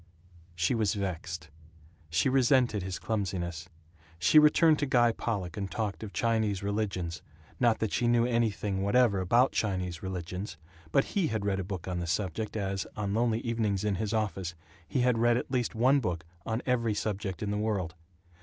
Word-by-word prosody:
She 85 Hz, +8 st, +1 dB
was 110 Hz, -4 st, +1 dB
vexed. 85 Hz, -5 st, -4 dB, 0.6 s
She 85 Hz, +10 st, +2 dB
resented 130 Hz, -4 st, +3 dB
his 95 Hz, 0 st, -4 dB
clumsiness. 90 Hz, -6 st, -3 dB, 0.5 s
She 85 Hz, -, +6 dB
returned 150 Hz, +1 st, +5 dB
to 145 Hz, -, 0 dB
Guy 120 Hz, -2 st, +4 dB
Pollock 100 Hz, -7 st, -3 dB
and 100 Hz, -1 st, -3 dB
talked 105 Hz, +2 st, -3 dB
of 110 Hz, -3 st, -6 dB
Chinese 110 Hz, -4 st, 0 dB
religions 100 Hz, -5 st, -2 dB, 0.4 s
not 120 Hz, -3 st, +4 dB
that 110 Hz, -, -2 dB
she 120 Hz, -, +1 dB
knew 120 Hz, 0 st, +4 dB
anything 110 Hz, -5 st, 0 dB
whatever 100 Hz, 0 st, +3 dB
about 120 Hz, +8 st, +4 dB
Chinese 90 Hz, -5 st, -2 dB
religions, 95 Hz, 0 st, -5 dB, 0.3 s
but 135 Hz, -, +4 dB
he 190 Hz, -5 st, +2 dB
had 110 Hz, -3 st, -2 dB
read 100 Hz, -1 st, 0 dB
a -, -, -2 dB
book 95 Hz, -2 st, -6 dB
on 90 Hz, -1 st, -2 dB
the 85 Hz, -, -3 dB
subject 100 Hz, +4 st, -2 dB
as, 100 Hz, -1 st, -2 dB
on 100 Hz, -2 st, -1 dB
lonely 115 Hz, 0 st, +1 dB
evenings 110 Hz, -5 st, -1 dB
in 105 Hz, -1 st, +1 dB
his 105 Hz, -2 st, -2 dB
office, 95 Hz, -5 st, -2 dB, 0.3 s
he 130 Hz, -, 0 dB
had 125 Hz, -2 st, +2 dB
read 120 Hz, 0 st, +4 dB
at 125 Hz, -, -4 dB
least 125 Hz, -3 st, 0 dB
one 130 Hz, +5 st, +4 dB
book 85 Hz, -9 st, -3 dB, 0.2 s
on 115 Hz, +2 st, -1 dB
every 115 Hz, -4 st, +1 dB
subject 105 Hz, -1 st, -3 dB
in 105 Hz, -, -1 dB
the 105 Hz, -, -1 dB
world. 100 Hz, -6 st, -1 dB
105 Hz, 180 wpm, -29 LUFS, 95-115 Hz, 0.6 s, She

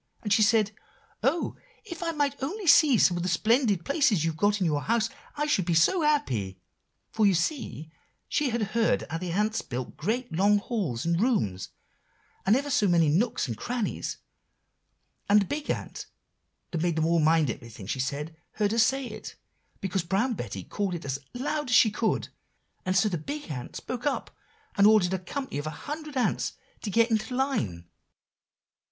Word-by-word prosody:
And 210 Hz, -2 st, +1 dB
she 215 Hz, -, +4 dB
said, 215 Hz, 0 st, +4 dB, 0.5 s
'Oh! 275 Hz, +9 st, 0 dB, 0.3 s
if 345 Hz, -5 st, -8 dB
I 340 Hz, -, -1 dB
might 285 Hz, -3 st, -1 dB
only 375 Hz, +10 st, -3 dB
see 290 Hz, -5 st, +6 dB
some 175 Hz, -3 st, +4 dB
of -, -, -2 dB
the 180 Hz, -, -1 dB
splendid 215 Hz, 0 st, +2 dB
places 245 Hz, -, +2 dB
you've 165 Hz, -1 st, -1 dB
got 205 Hz, +5 st, +2 dB
in 185 Hz, -, +1 dB
your 150 Hz, -3 st, +1 dB
house, 230 Hz, -, 0 dB, 0.3 s
I 295 Hz, -, +1 dB
should 195 Hz, -, +1 dB
be 170 Hz, -1 st, +1 dB
so 250 Hz, -, +4 dB
happy;' 125 Hz, -, 0 dB, 0.5 s
for 215 Hz, -2 st, +3 dB
you 195 Hz, -, +4 dB
see 165 Hz, -, -2 dB, 0.4 s
she 295 Hz, -3 st, +1 dB
had 235 Hz, -1 st, -1 dB
heard 230 Hz, -1 st, +2 dB
how 165 Hz, -, -2 dB
the 180 Hz, -1 st, -4 dB
ants 210 Hz, +4 st, 0 dB
build 125 Hz, 0 st, -6 dB
great, 225 Hz, -, -2 dB
long 200 Hz, +5 st, +4 dB
halls 195 Hz, -, -2 dB
and 170 Hz, +2 st, +1 dB
rooms, 105 Hz, -, 0 dB, 0.8 s
and 210 Hz, -, +6 dB
ever 285 Hz, +2 st, -1 dB
so 210 Hz, -5 st, +3 dB
many 170 Hz, -4 st, +4 dB
nooks 195 Hz, +3 st, +1 dB
and 115 Hz, -, -3 dB
crannies. 240 Hz, -, -3 dB, 1.1 s
And 205 Hz, +1 st, +7 dB
the -, -, -1 dB
big 290 Hz, +9 st, -4 dB
ant -, -, -4 dB, 0.6 s
that 165 Hz, -, -2 dB
made 170 Hz, -1 st, +1 dB
them 160 Hz, 0 st, +1 dB
all 170 Hz, 0 st, +3 dB
mind 155 Hz, -3 st, +3 dB
everything 115 Hz, -3 st, -10 dB
she 120 Hz, +6 st, -3 dB
said, 145 Hz, +5 st, -3 dB, 0.2 s
heard 210 Hz, -1 st, 0 dB
her 230 Hz, -, +1 dB
say 265 Hz, +4 st, +3 dB
it, 215 Hz, -2 st, -8 dB, 0.5 s
because 190 Hz, -1 st, -1 dB
Brown 195 Hz, +9 st, 0 dB
Betty 100 Hz, -, -5 dB
called 195 Hz, -, -2 dB
it 170 Hz, -, -7 dB
as 135 Hz, 0 st, -2 dB
out 140 Hz, -, -12 dB
loud 295 Hz, 0 st, -2 dB
as 245 Hz, -, +4 dB
she 220 Hz, -, +6 dB
could; 220 Hz, +1 st, -1 dB, 0.6 s
and 185 Hz, +1 st, +2 dB
so 215 Hz, -, +4 dB
the 175 Hz, -6 st, -2 dB
big 290 Hz, -, -6 dB
ant 125 Hz, -4 st, -6 dB
spoke 250 Hz, +3 st, -4 dB
up, 285 Hz, -, -2 dB, 0.4 s
and 200 Hz, 0 st, +6 dB
ordered 205 Hz, -4 st, +4 dB
a 190 Hz, -, 0 dB
company 225 Hz, -, -5 dB
of 145 Hz, -, -4 dB
a 155 Hz, -1 st, -7 dB
hundred 300 Hz, -1 st, -5 dB
ants 250 Hz, -, 0 dB, 0.3 s
to 215 Hz, -, -4 dB
get 230 Hz, +3 st, +3 dB
into 220 Hz, +3 st, 0 dB
line." 125 Hz, -, -1 dB
205 Hz, 190 wpm, -27 LUFS, 165-250 Hz, 1.1 s, And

